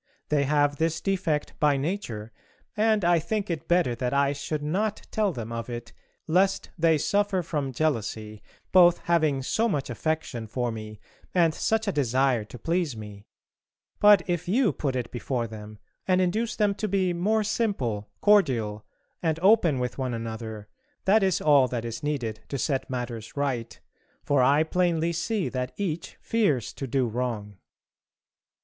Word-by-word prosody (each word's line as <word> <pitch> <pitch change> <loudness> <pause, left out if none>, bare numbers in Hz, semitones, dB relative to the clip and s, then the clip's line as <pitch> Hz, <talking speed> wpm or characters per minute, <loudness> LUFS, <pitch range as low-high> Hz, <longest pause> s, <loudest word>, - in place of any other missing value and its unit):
They 145 -2 +2
have 145 0 +2
this 165 0 0
defect 185 -6 -1
by 145 -2 +3
nature, 135 - -4 0.4
and 215 -3 +2
I 175 -1 +4
think 195 +4 -2
it 165 -1 -4
better 175 -8 +3
that 125 +2 -2
I 140 0 +3
should 145 +1 -4
not 200 +8 -1
tell 210 -3 +1
them 115 -6 -6
of 115 +1 -5
it, 120 -1 -7 0.3
lest 190 +4 +1
they 165 -2 +3
suffer 200 +3 +1
from 150 -5 -2
jealousy, 110 -7 -2 0.3
both 175 -2 +7
having 155 -6 +2
so 225 - +1
much 140 - -2
affection 135 -4 -3
for 120 +2 -2
me 110 -1 -8 0.4
and 170 -3 +4
such 220 +5 0
a - - +2
desire 130 - +1
to 125 - -11
please 165 -4 -1
me; 105 -1 -10 0.7
but 205 -4 +7
if 175 -2 -2
you 225 +3 +2
put 135 -3 -2
it 125 -2 -3
before 120 0 -2
them 110 -1 -9 0.3
and 185 -1 +3
induce 215 +6 0
them 210 -2 +2
to 215 - 0
be 190 -2 +1
more 210 +5 +1
simple, 165 - -1
cordial, 120 - +3 0.4
and 160 -2 0
open 190 -8 +5
with 125 +1 -3
one 130 -2 -1
another 110 -2 -6 0.4
that 215 +3 +5
is 190 -3 +2
all 145 -4 +5
that 120 -2 -4
is 115 -1 -5
needed 130 -7 -2
to 140 - -2
set 135 0 -1
matters 120 -2 -5
right, 120 -6 -2 0.4
for 145 -2 +2
I 140 +4 +4
plainly 170 0 +1
see 195 +4 -1
that 125 -1 -3
each 175 -3 -3
fears 180 - 0
to 135 - -5
do 130 +1 +1
wrong. 110 -4 -3
145 Hz, 165 wpm, -26 LUFS, 120-180 Hz, 0.7 s, both